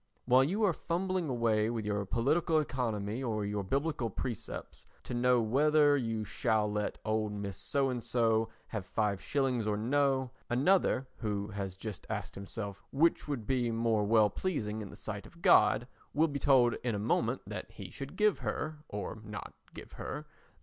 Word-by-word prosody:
While 130 Hz, +1 st, +6 dB
you 195 Hz, +10 st, 0 dB
are 195 Hz, -4 st, +4 dB
fumbling 180 Hz, 0 st, -1 dB
away 115 Hz, -3 st, +2 dB
with 115 Hz, -2 st, -3 dB
your 105 Hz, -1 st, 0 dB
political 155 Hz, -, +2 dB
economy 115 Hz, -6 st, -2 dB
or 110 Hz, -5 st, -1 dB
your 100 Hz, 0 st, -2 dB
biblical 135 Hz, +2 st, -1 dB
precepts 115 Hz, +1 st, -6 dB, 0.2 s
to -, -, -6 dB
know 125 Hz, 0 st, +3 dB
whether 145 Hz, +5 st, +4 dB
you 115 Hz, -5 st, -1 dB
shall 105 Hz, 0 st, 0 dB
let 105 Hz, 0 st, -2 dB
old 110 Hz, -1 st, 0 dB
Mrs. 100 Hz, -1 st, -4 dB
So 135 Hz, +6 st, 0 dB
and 120 Hz, -2 st, -3 dB
so 115 Hz, -2 st, +2 dB, 0.2 s
have 100 Hz, -5 st, -5 dB
5/ 115 Hz, +3 st, 0 dB
or 105 Hz, -1 st, +1 dB
no, 130 Hz, +2 st, +1 dB, 0.2 s
another, 135 Hz, +1 st, +3 dB
who 100 Hz, -2 st, -2 dB
has 100 Hz, -3 st, -5 dB
just 105 Hz, -2 st, -7 dB
asked -, -, -3 dB
himself 100 Hz, 0 st, -6 dB
which 160 Hz, +4 st, +2 dB
would 135 Hz, -7 st, -3 dB
be 125 Hz, 0 st, +1 dB
most 115 Hz, -2 st, +1 dB
well 110 Hz, -3 st, +5 dB
pleasing 110 Hz, -, -2 dB
in 100 Hz, -, -7 dB
the -, -, -11 dB
sight 105 Hz, -2 st, -6 dB
of 170 Hz, -, -18 dB
God, 120 Hz, -, +5 dB, 0.3 s
will 160 Hz, +2 st, +4 dB
be 145 Hz, -2 st, -3 dB
told 130 Hz, -4 st, +5 dB
in 120 Hz, -3 st, 0 dB
a -, -, -1 dB
moment 105 Hz, -, 0 dB
that -, -, -6 dB
he -, -, -9 dB
should 135 Hz, 0 st, -7 dB
give 210 Hz, -2 st, +3 dB
her—or 150 Hz, -9 st, -4 dB
not 105 Hz, -1 st, -7 dB, 0.2 s
give -, -, -9 dB
her—the -, -, -5 dB
5 -, -, -31 dB
115 Hz, 175 wpm, -32 LUFS, 105-140 Hz, 0.3 s, While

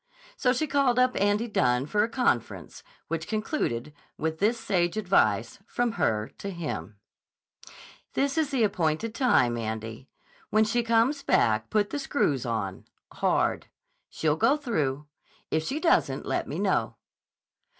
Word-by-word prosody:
So 260 Hz, -, +2 dB
she 265 Hz, +5 st, 0 dB
called 275 Hz, -4 st, +2 dB
up 255 Hz, 0 st, +3 dB
Andy 205 Hz, +3 st, +2 dB
Dunne 125 Hz, -, +1 dB
for 205 Hz, +7 st, +1 dB
a 225 Hz, -, -1 dB
conference, 230 Hz, -, -1 dB, 0.3 s
which 165 Hz, 0 st, -3 dB
concluded 180 Hz, -, -2 dB, 0.2 s
with 160 Hz, 0 st, -2 dB
this 225 Hz, +4 st, +2 dB
sage 185 Hz, -4 st, 0 dB
advice 120 Hz, -, +1 dB
from 245 Hz, -1 st, 0 dB
her 110 Hz, -, -1 dB
to 200 Hz, -, -5 dB
him: 170 Hz, -, -5 dB, 1.2 s
"This 275 Hz, 0 st, +1 dB
is 315 Hz, -3 st, +1 dB
the 265 Hz, -5 st, +1 dB
appointed 180 Hz, +2 st, 0 dB
time, 125 Hz, -, +3 dB
Andy. 110 Hz, +3 st, -5 dB, 0.4 s
When 215 Hz, +1 st, +4 dB
she 230 Hz, +3 st, +1 dB
comes 230 Hz, +5 st, +2 dB
back, 110 Hz, -, +2 dB
put 210 Hz, -1 st, +1 dB
the 290 Hz, -, -2 dB
screws 145 Hz, -, 0 dB
on 100 Hz, -5 st, -3 dB, 0.3 s
hard. -, -, 0 dB, 0.4 s
She'll 155 Hz, -1 st, 0 dB
go 275 Hz, -, +3 dB
through. 150 Hz, -, -2 dB, 0.5 s
If 160 Hz, 0 st, +1 dB
she 290 Hz, -, -2 dB
doesn't, 335 Hz, 0 st, +2 dB
let -, -, -1 dB
me -, -, -4 dB
know." -, -, 0 dB
205 Hz, 145 wpm, -27 LUFS, -, 1.2 s, When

